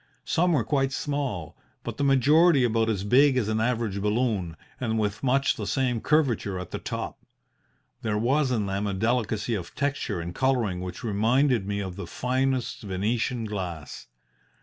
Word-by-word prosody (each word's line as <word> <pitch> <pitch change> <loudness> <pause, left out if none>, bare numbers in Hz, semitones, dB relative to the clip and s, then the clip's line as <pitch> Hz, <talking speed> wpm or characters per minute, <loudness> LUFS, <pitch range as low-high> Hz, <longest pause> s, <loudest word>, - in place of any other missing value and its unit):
Some 175 +1 +2
were 135 -7 +2
quite 135 +3 +1
small, 135 - -3 0.3
but - - -5
the 145 - -1
majority 140 +3 +5
about 115 -1 +2
as 100 -3 -1
big 130 +5 +4
as 115 -5 +1
an 110 0 0
average 115 -4 -1
balloon, 105 -6 0 0.2
and 110 -3 -1
with 105 -1 -1
much 135 +1 +2
the - - -4
same 125 -4 0
curvature 125 -11 +1
at 90 -1 -7
the - - -4
top. - - -5 0.8
There 110 -3 -1
was 135 +6 +2
in 115 -5 0
them 100 +1 -2
a 100 - -2
delicacy 110 +1 0
of 95 -6 -5
texture 140 -8 -1
and 85 +1 -5
colouring 120 -7 0
which 90 +5 -6
reminded 115 +1 +2
me 100 0 -1
of 95 -1 -6
the 100 - -6
finest 130 0 -1
Venetian 110 +5 -1
glass. 90 -7 -6
115 Hz, 170 wpm, -26 LUFS, 100-130 Hz, 0.8 s, majority